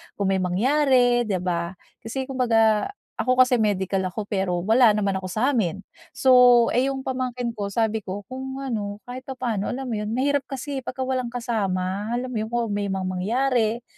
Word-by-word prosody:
kung 200 - -1
may 190 - +1
mangyari, 245 +5 +3
di 200 - 0
ba. 170 0 -2 0.2
Kasi 245 +4 -4
kumbaga, 225 -5 +2 0.3
ako 255 - +2
kasi 250 -1 +1
medical 195 -3 0
ako 210 +4 -4
pero 185 -4 -1
wala 225 +1 +5
naman 200 -2 +1
ako 190 - -6
sa'min. 215 - 0 0.3
So, 265 - +3 0.4
eh 255 +2 +2
yung 270 -1 -3
pamangkin 250 -2 -2
ko 210 -3 -4
sabi 220 +2 0
ko 200 0 -6
kung 265 +1 -5
ano 205 -5 -4
kahit 255 +1 -9
papaano 245 -6 -2
alam 260 0 -4
mo - - -1
yun, 210 +2 -3
mahirap 280 +1 0
kasi 275 +1 -4
eh - - -12
'pagka 260 +1 -4
walang 255 -1 -1
kasama, 205 -3 -2
alam 255 +1 -3
mo 225 - -2
yun? 215 - -2
Kung 235 -2 -1
may 205 0 -1
mga 190 -1 -2
mangyari 225 +5 0
230 Hz, 185 wpm, -24 LUFS, 200-255 Hz, 0.4 s, wala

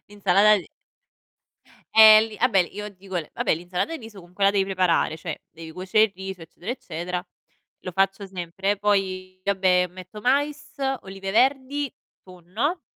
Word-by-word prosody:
l'insalata 205 +1 +4
di 185 - -6 1.3
Ehm, 220 0 +9
lì 215 - -10
ah 250 - +3
beh, 195 -6 +3
il 175 - -1
io 210 +1 -5
dico 190 -1 -8
le 165 -3 -4
vabbè - - +1
l'insalata 180 - -3
di 265 - -14
riso 220 -3 -11
comunque 180 +3 -4
la 200 - +6
devi 200 -1 +1
preparare, 185 -4 +1
cioè - - -7
devi 160 0 -11
cuocere 190 +5 +2
il 215 - -3
riso 190 -1 -7
eccetera 175 +5 -8
eccetera. 180 -5 -5 0.5
Lo 185 - -7
faccio 195 +2 0
sempre 190 +2 -3
poi 185 -2 -1
vabbè 185 -2 +2
metto 185 +3 -11
mais, 285 +5 0 0.3
olive 195 0 -6
verdi, 265 +4 +1 0.3
tonno 190 - -4
195 Hz, 160 wpm, -24 LUFS, 180-215 Hz, 1.3 s, Ehm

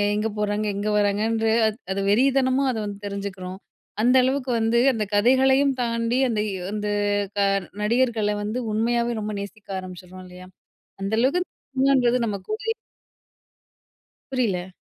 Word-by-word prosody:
எங்க 215 +1 0
போறாங்க? 210 0 0
எங்க 205 +1 -3
வராங்கன்ற? 215 +2 +1 0.5
அது 195 - -2
வெறி 235 +6 +4
தனமா 265 +1 +2
அத - - -4
வந்து 200 -1 -6
தெரிஞ்சுக்குறோம். 195 -2 -6 0.4
அந்தளவுக்கு 255 +2 +3
வந்து 225 +1 +2 0.2
அந்த 220 -3 -1
கதைகளையும் 265 +5 +4
தாண்டி, 230 +1 0
அந்த 220 -3 -1
வ் 200 - -3 0.2
அந்த 210 0 -3 0.5
க - - +1 0.4
நடிகர்கள 225 -1 +1
வந்து 215 +4 -2
உண்மையாவே 235 +2 +1
ரொம்ப 215 0 -3
நேசிக்க 205 +1 -10
ஆரம்பிச்சிட்றோம் 185 0 -10
இல்லயா? 180 0 -12 0.6
அந்தளவுக்கு 235 - +1 0.3
சினிமான்றது 260 -2 +3
நம்ம 210 -3 -1
கூடயே 450 +1 -2 1.6
புரியல. 195 -8 -1
225 Hz, 125 wpm, -24 LUFS, 205-255 Hz, 1.6 s, வெறி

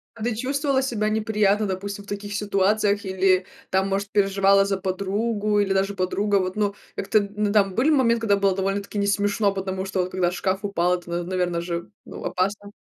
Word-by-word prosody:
А 225 - -9
ты 235 +1 0
чувствовала 270 +3 0
себя 225 -5 -1
неприятно, 215 -1 +1
допустим, 200 +1 -4
в - - -22
таких 205 0 -5
ситуациях 205 0 +1
или, 190 -1 +2 0.2
там, 190 +1 +1
может, 195 +1 -2
переживала 195 -1 +4
за 195 0 0
подругу 205 +3 -1
или 200 -1 +1
даже 195 +1 0
подруга, 200 +2 0
вот, 185 +1 -3
ну, 205 -1 0 0.2
как-то, 215 +2 +2 0.2
ну, 210 -1 0
там 200 -3 +3
были 255 +9 +3
моменты, 235 -6 +3
когда 200 -2 +4
было 195 -1 +2
довольно-таки 195 +2 -2
не 200 - +1
смешно, 205 0 +1
потому 190 -1 -3
что 190 -1 -2
вот 180 - -4
когда 180 -2 +1
шкаф 190 +1 -1
упал, 180 -3 +1
это, 175 0 -13
н 175 - -6
наверное 180 -2 -1
же, 170 0 -4
ну, - - -9
опасно. 200 +2 -2
200 Hz, 195 wpm, -24 LUFS, 190-210 Hz, 0.2 s, переживала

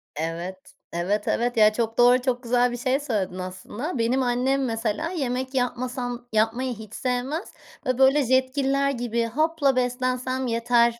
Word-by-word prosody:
Evet. 165 +4 -3 0.4
Evet 195 +5 -1
evet, 240 0 0
ya, 215 0 +6
çok 225 0 -2
doğru 245 +1 +6
çok 250 -1 -1
güzel 245 +1 +2
bir 240 - -4
şey 255 +3 +1
söyledin 200 -10 -2
aslında. 195 - -5
Benim 240 +3 +1
annem 255 +2 +1
mesela, 225 +6 -1
yemek 260 -5 -2
yapmasam, 245 -1 -2
yapmayı 230 +4 +1
hiç 220 -1 -11
sevmez 260 - -2 0.3
ve 255 -1 0
böyle 270 +2 +5
Jetgiller 270 +2 +2
gibi 235 -2 -1
hapla 285 +3 +1
beslensem 255 +1 -1
yeter 235 0 +2
245 Hz, 145 wpm, -25 LUFS, 230-260 Hz, 0.4 s, ya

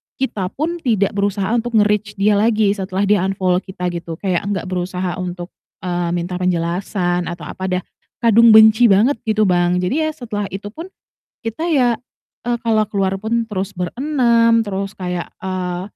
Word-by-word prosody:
kita 215 -8 -2
pun 335 +4 -2
tidak 215 - +1
berusaha 200 0 -1
untuk 240 0 -1
nge-reach 210 0 +2
dia 205 +1 +2
lagi 215 -2 +3
setelah 195 -1 -2
dia 205 0 +3
unfollow 185 -2 +1
kita 180 -2 -5
gitu, 170 -1 -6
kayak 185 +1 -2
nggak 200 -2 -2
berusaha 180 0 -3
untuk, 180 0 -5 0.3
eee, 175 -1 -1
minta 180 +1 -3
penjelasan 175 0 -1
atau 175 -2 -6
apa, 190 +4 -5
dah 185 -1 -1 0.4
kadung 230 -1 +6
benci 220 +2 +7
banget 225 +6 +4
gitu, 215 -2 +2
Bang. 175 0 +2
Jadi 285 +13 0
ya 310 - -2
setelah 215 -7 -4
itu 200 +1 -5
pun 320 +11 -8 0.6
kita 315 +10 -2
ya, 250 -6 +3 0.5
eee, 240 0 -1
kalau 220 -1 +3
keluar 195 -2 0
pun 225 +3 -1
terus 195 -2 -3
ber-6, 230 - +2
terus 195 0 -3
kayak, 180 -2 -4
eee, 180 -1 -3
200 Hz, 165 wpm, -19 LUFS, 180-225 Hz, 0.6 s, benci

